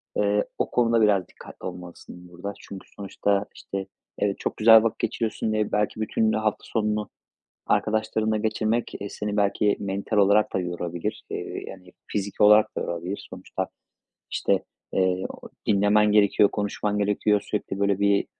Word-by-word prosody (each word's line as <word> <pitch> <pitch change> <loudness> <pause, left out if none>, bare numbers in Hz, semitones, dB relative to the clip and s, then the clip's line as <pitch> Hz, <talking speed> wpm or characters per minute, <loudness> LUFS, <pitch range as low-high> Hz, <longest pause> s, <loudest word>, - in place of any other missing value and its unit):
eee, 105 0 +2
o - - -1
konuda 115 -1 +3
biraz 100 -4 +3
dikkatli - - -13
olmalısın 90 0 -10
burada. 90 +4 -6
Çünkü, 95 -1 -10
sonuçta, 100 0 -1
işte, 95 -1 -5 0.3
evet, 100 -1 0
çok - - -3
güzel 110 0 +8
vakit 115 - -1
geçiriyorsun 110 -1 -1
diye 110 -1 0
belki 105 +1 0
bütün 110 0 +1
hafta 110 -1 -1
sonunu 105 -1 -1 0.6
arkadaşlarınla 110 0 +1
geçirmek, 110 +2 -1
eee, 100 - -4
seni 105 +1 -4
belki 100 0 +2
mental 100 +2 -3
olarak 100 +1 +4
da - - +2
yorabilir. 90 +3 -4
Eee, - - -5
yani, 90 -1 -11
fiziki 100 0 -2
olarak 105 +1 +6
da - - -1
yorabilir, 85 +4 -4
sonuçta. - - -5 0.6
İşte, - - 0 0.3
eee, 95 0 +1
o - - -10 0.2
dinlemen 105 +1 +4
gerekiyor, 105 0 +5
konuşman 105 0 -2
gerekiyor, 105 0 +2
sürekli, 100 -1 -4
böyle, 100 -1 +2
bir 100 0 +2
105 Hz, 150 wpm, -25 LUFS, 100-110 Hz, 0.6 s, güzel